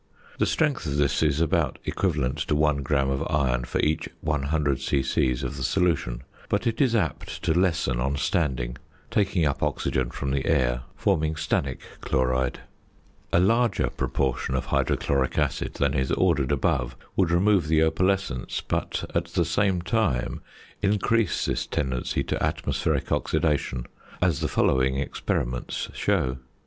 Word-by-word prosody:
The - - +3
strength 145 - 0
of 70 0 -1
this 70 -1 +2
is 75 -2 +2
about 80 -2 +1
equivalent 65 0 0
to 75 - +1
1 75 -1 +3
gram 70 0 +1
of 65 - -1
iron 60 -5 +1
for - - -2
each 75 +1 0
100 75 -2 0
c.c. 65 -1 +1
of 65 - -4
the - - -6
solution, 80 -10 0 0.3
but - - 0
it 115 +2 0
is 125 -4 +3
apt 80 - -2
to - - +2
lessen 85 -8 +1
on 70 +3 0
standing, 65 -5 -1 0.3
taking 100 -6 +2
up 70 - 0
oxygen 65 -2 0
from 70 +2 -4
the 70 -1 -1
air, - - +2
forming 80 0 +1
stannic 75 -4 -1 0.2
chloride. 65 0 0 0.7
A - - +4
larger 115 +6 +2
proportion 65 -1 -1
of 65 - -1
hydrochloric 70 -2 0
acid - - -1
than 70 -1 +1
is 65 -3 0
ordered 65 +1 +2
above 70 -3 0 0.2
would 95 -4 +2
remove 90 0 +3
the 80 0 +4
opalescence, 90 -3 0
but - - -2
at - - +1
the 85 - 0
same 90 +1 +1
time 90 - 0 0.4
increase 105 0 +1
this - - -1
tendency 65 -3 -1
to - - -2
atmospheric - - -1
oxidation, 70 -5 0 0.3
as 85 -6 +2
the - - 0
following 65 0 +2
experiments 60 -3 -2
show. 65 0 0
75 Hz, 150 wpm, -26 LUFS, 65-85 Hz, 0.7 s, A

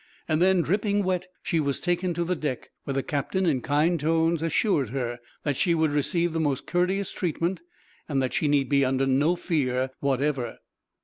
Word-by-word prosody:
Then, 175 +3 +3
dripping 205 +4 +1
wet, 185 -1 -1 0.2
she 165 - 0
was 140 -3 0
taken 175 0 0
to 170 - 0
the 180 +2 -1
deck, 145 -6 -4
where 140 - -2
the 135 - 0
captain, 170 +6 -1
in 140 -7 +1
kind 160 +5 +2
tones, 165 +1 +1
assured 165 - +1
her 120 -1 -3 0.2
that 145 -2 0
she 170 -3 +2
would 160 -2 +2
receive 170 +4 +1
the 165 - -1
most 145 -4 0
courteous 185 +2 0
treatment, 175 +1 -2 0.5
and 140 -3 +1
that 130 -2 -1
she 150 - +1
need 145 -2 +2
be 140 0 +3
under 135 +1 +1
no 140 +6 +3
fear, 130 -7 -1
whatever. 135 -3 -1
155 Hz, 185 wpm, -26 LUFS, 140-175 Hz, 0.5 s, Then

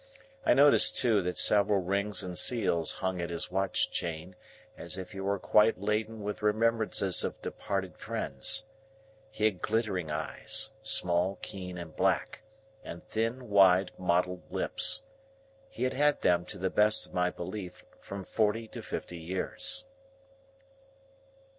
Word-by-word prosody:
I - - +4
noticed, 145 +2 +6
too, 115 -5 +3
that 90 0 -3
several 105 -1 +5
rings 100 +2 0
and 90 -1 -6
seals 85 -8 +2
hung 95 -1 -3
at 85 - -4
his 85 +1 -3
watch 95 0 0
chain, 85 +2 -5 0.4
as - - -6
if 95 -1 -7
he 95 - -8
were 100 +1 -1
quite 105 +2 +3
laden 105 +2 -2
with 105 +1 -5
remembrances 110 -3 +2
of - - -4
departed 95 -2 -4
friends. 110 +11 +1 0.6
He 110 0 -2
had 100 -5 0
glittering 105 -7 -1
eyes,—small, 85 +4 -1
keen, 90 -2 -7
and 85 -3 -9
black,—and 110 -4 -4
thin 115 +3 -2
wide 95 -2 +4
mottled 90 0 -1
lips. - - +1 0.7
He - - -6
had 130 0 0
had 145 +2 +1
them, 90 0 +2
to - - -8
the 95 +1 -2
best 105 +1 +3
of - - -18
my 90 0 +1
belief, 90 +1 -8
from 100 0 -8
forty 110 +3 -1
to - - -8
fifty 85 - -6
years. 95 - -2
100 Hz, 140 wpm, -29 LUFS, 90-110 Hz, 0.7 s, noticed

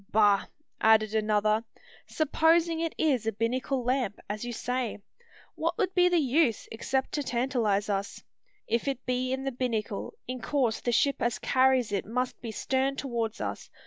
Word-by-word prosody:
"Bah!" 205 -2 +4 0.4
added 220 -1 +4
another; 215 0 +2 0.4
"supposing 320 +2 +2
it 330 -1 -2
is 260 -8 +1
a - - +2
binnacle 250 +4 -1
lamp, 245 -4 0
as 210 +2 -4
you 240 - -4
say, 245 0 -2 0.6
what - - -2
would 380 -4 0
be 360 -1 +5
the 355 - +3
use, 275 -4 +2
except 265 +4 -1
to 295 - -1
tantalise 240 -6 0
us. 200 -1 -3 0.4
If 235 +4 -1
it 270 -2 -2
be 255 0 -1
in 265 0 -2
the 270 - -1
binnacle, 240 - -3
in 255 -1 -5
course 250 -6 0
the 240 - 0
ship 280 +4 +2
as 235 -1 +1
carries 260 -3 +2
it 200 -2 -1
must 250 +3 -2
be 230 - -5
stern 265 +4 0
towards 235 -5 -3
us. - - -5
250 Hz, 170 wpm, -28 LUFS, 220-270 Hz, 0.6 s, be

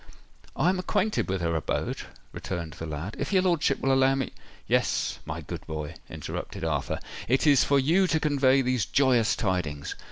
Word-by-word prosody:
"I 155 +7 +3
am 185 0 +1
acquainted 210 - 0
with 95 -1 -1
her 85 -1 0
abode," 80 - -2 0.2
returned 85 -4 -5
the 80 -1 -7
lad. 80 +7 -5
"If 145 - -2
your 190 -2 +4
lordship 165 -7 +2
will 135 0 +2
allow 135 0 +4
me——" 135 -3 -2 0.3
"Yes, - - +1
my - - -4
good - - -7
boy," 80 -1 -4 0.2
interrupted - - -6
Arthur. 80 -4 -1 0.3
"It 130 +5 +2
is 145 -4 +6
for 140 - +3
you 165 +8 +3
to 160 -2 +1
convey 135 -3 +3
these 125 -5 +1
joyous 125 -5 +3
tidings. 85 -8 -2
130 Hz, 180 wpm, -27 LUFS, -, 0.3 s, is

